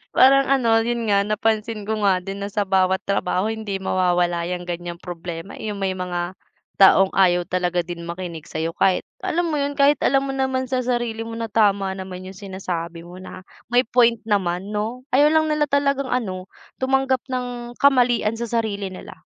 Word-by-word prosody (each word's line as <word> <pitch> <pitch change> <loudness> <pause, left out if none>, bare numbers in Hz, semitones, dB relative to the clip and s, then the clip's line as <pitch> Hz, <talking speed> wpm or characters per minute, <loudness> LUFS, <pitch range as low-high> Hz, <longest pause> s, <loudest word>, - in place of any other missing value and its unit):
Parang 275 +1 +6
ano, 235 -4 +4
yun 235 -1 -2
nga, 200 -1 +3
napansin 215 +1 -1
ko 215 -1 -1
nga 190 -2 +3
din 195 +2 -6
na 200 - -4
sa 205 0 0
bawat 190 0 +2
trabaho 195 0 0
hindi 220 -3 -3
mawawala 175 -2 +1
yung 180 0 -5
ganyang 175 0 -5
problema, 175 +1 -7
eh, 215 - -5
yung 200 - -6
may 190 -1 0
mga 180 0 -3 0.4
taong 195 0 +6
ayaw 180 -2 +3
talaga 180 -1 -1
din 170 0 -7
makinig 170 -2 -6
sayo, 160 +1 -3
kahit 185 +2 +2 0.2
alam 340 0 -1
mo 300 - 0
yun? 285 0 -1
Kahit 280 0 +4
alam 270 0 +2
mo 275 - -3
naman 265 -1 -1
sa 255 - +1
sarili 240 -2 -2
mo 230 - -6
na 230 -1 -5
tama 200 -3 +2
naman 190 -1 -7
yung 190 +1 -9
sinasabi 175 -4 -5
mo 175 +2 -11
na 185 0 -10 0.2
may 245 +1 +3
point 235 -1 +3
naman 195 -2 -1
no? 220 +4 -3
Ayaw 285 +3 +5
lang 315 0 +2 0.2
talagang 280 -1 +1
ano, 190 -8 -3 0.3
tumanggap 265 0 +1
ng 245 -1 -5
kamalian 245 -5 +3
sa 235 - -3
sarili 215 -4 -2
nila. 185 - -9
205 Hz, 185 wpm, -22 LUFS, 185-245 Hz, 0.4 s, Parang